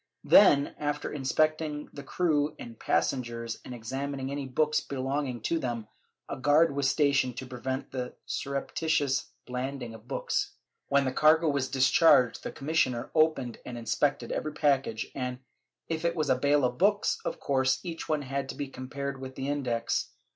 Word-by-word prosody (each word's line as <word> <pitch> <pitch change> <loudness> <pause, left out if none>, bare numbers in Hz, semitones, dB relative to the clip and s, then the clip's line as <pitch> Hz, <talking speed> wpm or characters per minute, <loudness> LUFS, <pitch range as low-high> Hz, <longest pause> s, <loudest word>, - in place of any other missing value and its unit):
Then, 145 -8 +6
after 145 0 -2
inspecting 150 +2 0
the 145 - -7
crew 150 -1 0
and 115 -1 -10
passengers 115 -3 -1
and 125 - -7
examining 135 +3 -4
any 140 -1 -3
books 150 +4 +1
belonging 135 -2 -3
to 165 +8 0
them, 120 -5 -3 0.4
a - - -5
guard 145 +2 +4
was 140 -1 +2
stationed 140 -4 +2
to 130 - -5
prevent 130 +1 -4
the 125 -1 -4
surreptitious 140 0 -1 0.2
landing 125 -1 -4
of 110 +1 -13
books. 135 - -2 0.3
When 140 0 +3
the 130 - 0
cargo 155 +3 +4
was 140 -2 0
discharged, 130 -1 +4
the - - -5
commissioner 135 -5 0
opened 155 -7 +2
and 120 - -7
inspected 140 +4 0
every 155 - -2
package 135 -7 +1
and, 125 -1 -3 0.5
if 160 0 -3
it 170 0 +1
was 155 -4 +1
a - - +5
bale 140 +1 +3
of 125 0 -2
books, 205 +2 +2
of - - -4
course 130 -1 +1
each 170 -3 -6
one 155 -2 +1
had 135 0 -3
to - - -5
be 140 -2 -4
compared 135 +1 -5
with 130 0 -7
the 135 - -4
Index. 125 -5 -1
140 Hz, 165 wpm, -29 LUFS, 130-150 Hz, 0.5 s, Then